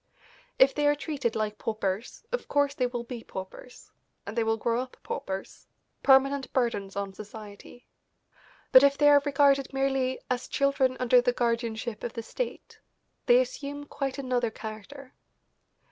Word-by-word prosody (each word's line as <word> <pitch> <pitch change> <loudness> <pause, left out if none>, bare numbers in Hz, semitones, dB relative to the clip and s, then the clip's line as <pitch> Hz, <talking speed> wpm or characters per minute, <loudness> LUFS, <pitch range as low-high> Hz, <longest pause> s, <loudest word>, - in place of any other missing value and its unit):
If 270 +1 +6
they 295 -1 +1
are 290 - +4
treated 285 -6 -3
like 215 -1 -2
paupers 215 0 -3
of - - -3
course 285 -1 +2
they 255 -3 0
will 240 -1 -4
be 235 -1 -7
paupers, 190 +6 -10 0.3
and 200 - -6
they 230 - +2
will 225 0 +1
grow 235 +2 0
up 255 0 -9
paupers, 190 0 -6 0.3
permanent 270 0 +4
burdens 205 -6 -1
on 200 -1 -3
society; 210 +3 -11 0.9
but 260 - +10
if 280 0 +4
they 290 - +5
are 290 -1 +7
regarded 280 -1 +3
merely 270 -1 0
as 250 0 -2
children 275 -2 +1
under 250 0 +5
the 245 0 +1
guardianship 230 -2 -2
of 240 - -4
the 230 - -5
state, - - -6 0.5
they 245 -1 +7
assume 280 +3 -4
quite 275 -2 -4
another 250 -3 0
character. 220 +6 -9
250 Hz, 155 wpm, -28 LUFS, 225-275 Hz, 0.9 s, but